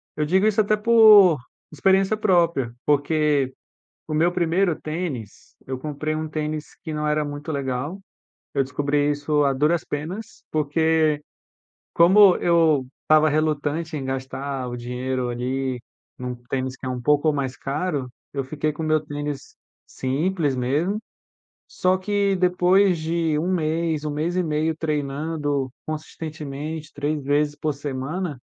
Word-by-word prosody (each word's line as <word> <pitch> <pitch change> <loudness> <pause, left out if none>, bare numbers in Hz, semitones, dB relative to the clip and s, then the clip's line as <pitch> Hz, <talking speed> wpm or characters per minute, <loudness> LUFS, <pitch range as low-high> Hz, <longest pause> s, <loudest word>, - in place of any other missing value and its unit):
Eu 150 - 0
digo 190 +6 +3
isso 215 0 +1
até 215 0 +2
por 210 -6 +7 0.3
experiência 190 +6 +2
própria, 170 - +2
porque 145 -2 +2 0.5
o 155 - -2
meu 165 +3 +3
primeiro 175 0 +1
tênis, 155 - -5
eu 130 0 -3
comprei 155 +2 -3
um 155 0 -3
tênis 155 0 -4
que 160 - -5
não 150 0 -2
era 150 0 +1
muito 145 +2 -5
legal. 140 +5 -3 0.6
Eu 135 - +3
descobri 145 +2 0
isso 145 +1 +1
a 140 - +3
duras 150 +5 +2
penas, 170 +9 -6
porque 155 0 +2 0.7
como 190 +3 +7
eu 165 -5 +3 0.2
estava 155 0 +5
relutante 155 +1 -1
em 140 - -4
gastar 135 0 -4
o 120 - -5
dinheiro 125 +1 -3
ali, 125 +1 -2 0.4
num 125 0 -4
tênis 130 -1 -2
que - - -12
é - - -2
um 125 -1 -3
pouco 150 +4 +3
mais 135 -3 -2
caro, 140 -1 -2 0.2
eu 140 - -2
fiquei 150 +3 -2
com 150 - -6
o - - -2
meu 155 0 +3
tênis 145 -2 -5 0.3
simples 145 +2 -1
mesmo, 150 +11 0 0.7
só 185 0 +2
que 200 +1 +1
depois 180 +1 +3
de 160 -1 0
1 175 +5 0
mês, 160 -2 0
1 150 - -2
mês 155 +4 -2
e 185 - +2
meio 155 0 0
treinando 145 -2 -2
consistentemente, 155 -1 -6
3 145 +1 -2
vezes 145 +1 +1
por 150 0 -2
semana, 145 +3 -4
150 Hz, 145 wpm, -23 LUFS, 140-170 Hz, 0.7 s, por